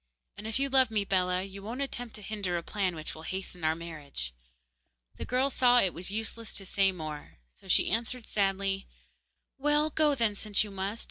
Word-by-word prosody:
And 215 - -7
if 220 - +1
you 275 +1 +2
love 265 -2 +4
me, 210 -2 0
Bellah, 185 -1 +1
you 195 0 -8
won't 235 +7 -3
attempt 245 -4 -5
to 210 - -9
hinder 195 -4 -2
a 170 - -3
plan 190 -3 -1
which 155 -1 -4
will 160 - -10
hasten 185 0 -3
our 155 0 +3
marriage.' 150 - -5 0.8
The - - -4
girl 260 +3 +1
saw 245 -1 +5
it 190 -6 +3
was 180 +2 -5
useless 225 +2 -3
to 195 - -2
say 195 0 +3
more, 155 -4 -7 0.2
so - - -17
she - - +4
answered 235 +2 -1
sadly: 195 -1 0 0.7
'Well, 295 +2 +3
go 300 -1 +3
then, 230 -5 +2
since 205 0 +2
you 210 - -8
must. 195 +3 -3
200 Hz, 200 wpm, -30 LUFS, 180-235 Hz, 0.8 s, saw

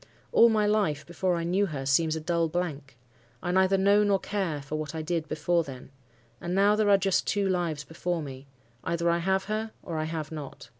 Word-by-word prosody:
All 235 - +7
my 215 -2 +2
life, 205 -9 +1
before 175 +1 -1
I 170 - -2
knew 190 +4 +1
her, 140 -5 -5
seems 155 +4 +2
a - - -2
dull 165 0 0
blank. 155 -7 -4 0.5
I 175 - -1
neither 190 +1 +3
know 200 +2 +4
nor 200 -1 +3
care 190 -6 -2
for 145 +2 -6
what 155 0 -4
I 160 - -3
did 165 -1 -2
before 170 +3 +1
then. 130 -2 -10 0.5
And 175 +1 -3
now 200 +2 +4
there 210 -1 +2
are 200 - +7
just 195 -1 +1
two 200 -1 +1
lives 170 -5 -1
before 170 +1 -3
me. 135 -1 -9 0.4
Either 170 0 0
I 170 - +1
have 190 +2 +1
her, 215 +1 -3
or 165 -3 -4
I 155 - -1
have 160 -1 -4
not. 145 -6 -8
170 Hz, 215 wpm, -27 LUFS, 155-195 Hz, 0.5 s, All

